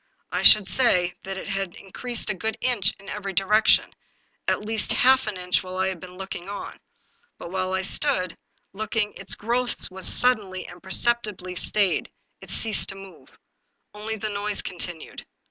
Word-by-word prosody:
I - - -1
should 210 -3 +8
say 180 -8 +3
that 195 0 -6
it 190 - -7
had 195 -2 -2
increased 235 +5 -3
a - - -1
good 220 +4 -3
inch 220 -6 +3
in 195 - -14
every 200 -1 -5
direction, 210 +4 +3 0.5
at 210 - 0
least 220 0 0
half 260 -1 +4
an 210 -3 -3
inch 180 0 0
while 185 -1 -7
I 190 0 +1
had 185 -3 -5
been 180 +1 -11
looking 190 -1 -6
on. 205 - -7 0.6
But 170 - -9
while 185 0 -2
I 190 - -1
stood 185 - 0 0.4
looking 215 +1 -2
its - - -3
growth 240 -1 -1
was 190 -1 0
suddenly 205 -7 +1
and 175 - -12
perceptibly 200 -2 +1
stayed; 195 +1 0 0.3
it - - -12
ceased 220 -3 +3
to 195 - -5
move. 195 -1 -14 0.6
Only 215 +1 -4
the 215 0 -4
noise 205 0 -2
continued. 175 -2 -6
195 Hz, 170 wpm, -24 LUFS, 185-220 Hz, 0.6 s, should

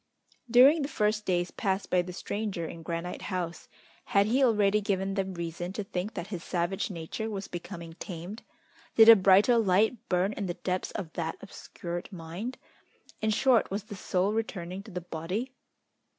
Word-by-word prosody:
During 265 +7 +7
the 280 - -1
first 210 -4 0
days 175 -1 +1
passed 195 -1 -2
by 180 - +4
the 180 +1 -7
stranger 200 -1 -3
in 165 +1 -7
Granite 170 +2 -4
House, 180 -3 -4 0.4
had 200 0 +3
he 250 +6 +2
already 210 -3 +3
given 195 -1 -1
them 195 -1 -2
reason 170 +1 -4
to 210 - -3
think 195 +2 -4
that 175 - -3
his 175 -2 -4
savage 185 +5 -1
nature 190 +5 -4
was 200 -2 -4
becoming 170 -1 -7
tamed? 180 +5 -7 0.5
Did 225 0 +9
a 230 - +12
brighter 200 +4 +5
light 210 +3 +3
burn 185 +3 +2
in 200 -3 -3
the 175 - -3
depths 185 0 -2
of 175 -6 -5
that 165 -2 -3
obscured 175 -2 -7
mind? 180 +8 -6 0.6
In 220 - +1
short, 235 +2 +3
was 200 +1 -3
the 210 -1 -9
soul 190 +1 0
returning 190 -5 -3
to 215 - -13
the 180 -2 -5
body? 180 +9 -4
195 Hz, 175 wpm, -29 LUFS, 175-215 Hz, 0.6 s, a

